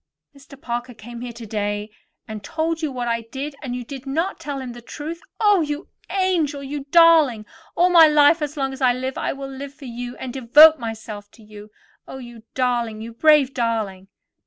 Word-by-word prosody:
"Mr. 275 0 -15
Parker 240 -3 -5
came 235 +2 -10
here 245 -1 -5
today, 210 -2 -4 0.4
and 215 -2 -7
told 325 +5 -2
you 310 -3 -2
what 245 -2 -4
I 230 0 0
did 270 +6 -6
yesterday, 280 - -21
and 250 -4 -4
you 250 - -5
did 270 +2 -9
not 325 +8 -2
tell 285 -2 -5
him 255 -2 -6
the 240 - -11
truth? 310 +7 -7 0.2
Oh, 415 -4 +4
you 295 +2 -4 0.2
angel! 345 -7 0
Oh, - - -8
you 280 0 -6
darling! 310 -8 +5 0.3
All 360 +1 +3
my 330 -2 +8
life, 300 +2 +5
as 295 +1 -4
long 270 -1 -1
as 265 - -10
I 250 -1 +4
live, 260 +1 -4
I - - -1
will 275 0 -6
live 275 +1 -8
for 285 - -12
you, 245 0 -7
and 255 -2 -6
devote 295 +5 +7
myself 220 -3 -7
to 225 - -18
you. 210 0 -13 0.4
Oh, - - -8
you 240 -3 -11
darling; 240 -4 -1
you 230 +1 -8
brave 290 +1 +4
darling!" 220 -6 -2
265 Hz, 205 wpm, -22 LUFS, 235-295 Hz, 0.4 s, my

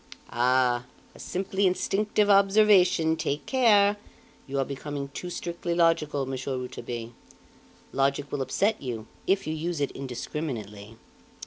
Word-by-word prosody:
"Ah! 125 0 +2 0.3
a - - -16
simply 190 +1 -1
instinctive 205 +3 +1
observation! 195 -5 +5
Take 145 -2 -3
care! 210 -6 +4 0.5
You 140 +1 -3
are 135 - +1
becoming 140 0 -5
too 180 +5 -6
strictly 170 0 -4
logical, 160 -5 +2
Monsieur 130 0 -3
Rouletabille; 120 -2 -6 0.8
logic 140 +1 0
will 140 - -2
upset 200 - 0
you 115 -4 -5 0.2
if 195 +1 +2
you 155 - -2
use 165 +1 -3
it 140 - 0
indiscriminately. 115 -5 -6
150 Hz, 125 wpm, -27 LUFS, 130-190 Hz, 0.8 s, observation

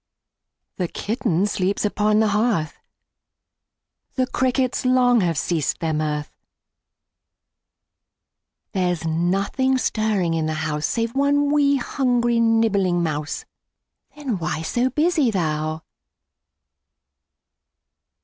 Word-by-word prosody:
The 180 - -1
kitten 205 -3 -1
sleeps 200 0 -1
upon 210 +1 +2
the 220 - +2
hearth, 210 -6 0 1.4
The 255 - +1
crickets 255 0 0
long 250 -2 +4
have 170 -4 0
ceased 160 -2 -1
their 160 -1 -1
mirth; 150 -1 -2 2.4
There's 180 -4 -1
nothing 195 +11 +1
stirring 215 -8 0
in 160 -1 -1
the 155 - -2
house 150 0 -1
Save 230 0 -2
one 285 +1 +2
'wee', 285 -1 +3
hungry, 245 -2 +1
nibbling 210 -6 +2
mouse, 155 -2 -3 0.7
Then 270 -10 -3
why 160 -1 -3
so 245 +9 0
busy 305 -2 +2
thou? 155 -4 -2
210 Hz, 100 wpm, -22 LUFS, 165-250 Hz, 2.4 s, long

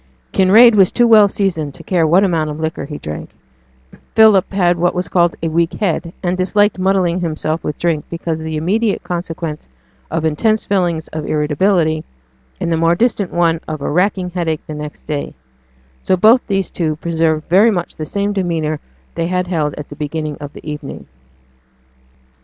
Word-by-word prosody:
Kinraid 220 +5 +6
was 195 -3 +4
too 240 - +3
well 220 -3 +7
seasoned 165 -8 -2
to - - -11
care 170 -4 +1
what 175 +5 +4
amount 165 -5 0
of 150 +1 -6
liquor 160 -3 -3
he 145 +1 -7
drank; 75 0 -7 0.9
Philip 215 -4 +5
had 175 -3 +1
what 175 +1 +1
was 180 0 -2
called 175 -2 +2
a - - +1
weak 165 +1 0
head, 170 -4 -2
and 180 0 0
disliked 205 +2 +1
muddling 185 -2 +1
himself 160 -1 -2
with 150 - -4
drink 165 -3 -1
because 165 -1 -4
of - - -7
the 160 -1 -3
immediate 205 +7 0
consequence 165 -3 -5 0.4
of 160 0 -2
intense 215 +8 +1
feelings 175 -5 0
of 155 -1 -5
irritability, 155 +1 +1 0.6
and 170 - -2
the 165 - +2
more 165 +1 +3
distant 210 -3 0
one 170 -1 +1
of 155 -1 -4
a 140 - -3
racking 180 +2 0
headache 165 -3 -2
next 150 -1 -7
day; 145 -2 -4 0.7
so 185 - +1
both 225 +7 +6
these 195 -3 -1
two 155 -3 -1
preserved 160 -1 -1
very 200 +7 +5
much 175 -6 -2
the 155 - -5
same 200 +3 -1
demeanour 165 -5 -1 0.3
they 165 - -2
had 180 0 -1
held 155 -5 -1
at 150 - -8
the 145 - -9
beginning 155 0 -4
of 145 -1 -7
the - - -12
evening. 150 -2 -7
170 Hz, 180 wpm, -17 LUFS, 155-190 Hz, 0.9 s, well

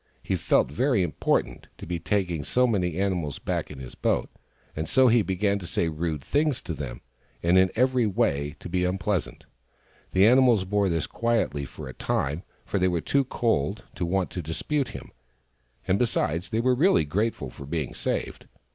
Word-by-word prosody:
He - - -1
felt - - +2
very 125 - +2
important, 75 -6 -1
to - - -9
be 85 0 -3
taking 90 -3 -1
so 125 - +2
many 90 -8 0
animals 90 -7 -1
back - - -3
in 75 - -9
his 65 -1 -9
boat; - - 0 0.4
and 80 +1 -3
so 130 -1 +5
he 115 0 +5
began 100 +1 0
to 90 - -8
say 85 - 0
rude 80 -2 -3
things 145 - +1
to 85 - -4
them, 65 -5 -6 0.4
and 85 +2 +4
in 95 0 +5
every 125 -1 +3
way 75 -7 0
to - - -7
be 90 +1 0
unpleasant. 95 0 -1 0.7
The 95 +2 +5
animals 120 -4 +5
bore 100 0 +1
this 80 -3 0
quietly 110 - 0
for 65 - -9
a 65 - -7
time, 75 +6 -1 0.2
for 100 - -1
they 90 - +3
were 90 -2 +1
too 140 - +1
cold 105 - 0
to 95 - -4
want 90 +1 0
to 90 - -4
dispute 130 - -1
with - - -10
him, - - -18 0.8
and 95 - +2
besides, 90 -7 0
they 115 0 0
were 130 +1 +3
really 150 - +4
very 75 - -12
grateful 105 - -1
for 70 - -10
being 75 -4 -3
saved. - - -3
95 Hz, 190 wpm, -26 LUFS, 80-115 Hz, 0.8 s, so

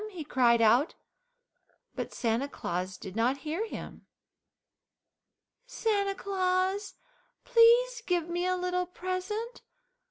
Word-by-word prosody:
he 360 -6 -7
cried 240 -5 +3
out, 240 +8 +4 1.0
but - - -5
Santa 235 +3 -1
Claus 180 -5 -4
did 190 +1 -9
not 240 +4 +1
hear 340 +9 -2
him. - - -9 1.6
"Santa 405 -5 0
Claus, 380 +1 -1 0.5
please 485 0 +5
give 350 -3 +1
me 350 +1 -1
a 365 0 +1
little 360 0 -1
present. 370 +6 -4
360 Hz, 105 wpm, -29 LUFS, 270-400 Hz, 1.6 s, please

